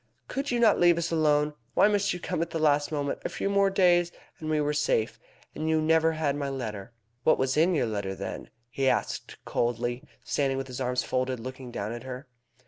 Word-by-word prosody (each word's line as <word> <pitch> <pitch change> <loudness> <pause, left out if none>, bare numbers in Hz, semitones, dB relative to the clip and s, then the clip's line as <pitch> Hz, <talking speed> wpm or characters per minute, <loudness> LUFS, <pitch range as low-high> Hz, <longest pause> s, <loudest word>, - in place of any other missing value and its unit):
Could 275 +2 -3
you 245 - 0
not 225 -3 +5
leave 175 -1 +5
us 170 0 -1
alone? 150 -2 +2 0.2
Why - - +6
must 205 -1 +1
you 180 - -3
come 165 - -2
at 170 - -1
the 165 - -3
last 150 -1 +2
moment? 145 -2 -2
A - - -2
few 195 - -2
more 200 0 +4
days, 175 -3 +3 0.3
and 155 - -5
we 155 -1 +2
were 150 0 +1
safe. 145 -7 0 0.3
And 160 +1 -3
you 160 0 +3
never 160 +1 +3
had 155 -3 0
my 140 -1 -2
letter." 115 -7 -4
"And - - -22 0.3
what 155 - +4
was 130 0 0
in 170 +4 +3
your 145 - +2
letter, 100 -3 -3
then?" - - -6 0.2
he 135 +1 +1
asked - - -2
coldly, 120 +1 -1 0.2
standing 135 -2 0
with 135 - -3
his 130 0 -7
arms 125 0 0
folded, 130 -1 -1
looking 130 +1 -7
down 105 -3 -4
at 120 0 -6
her. 130 +1 -8
145 Hz, 225 wpm, -28 LUFS, 130-165 Hz, 0.3 s, Why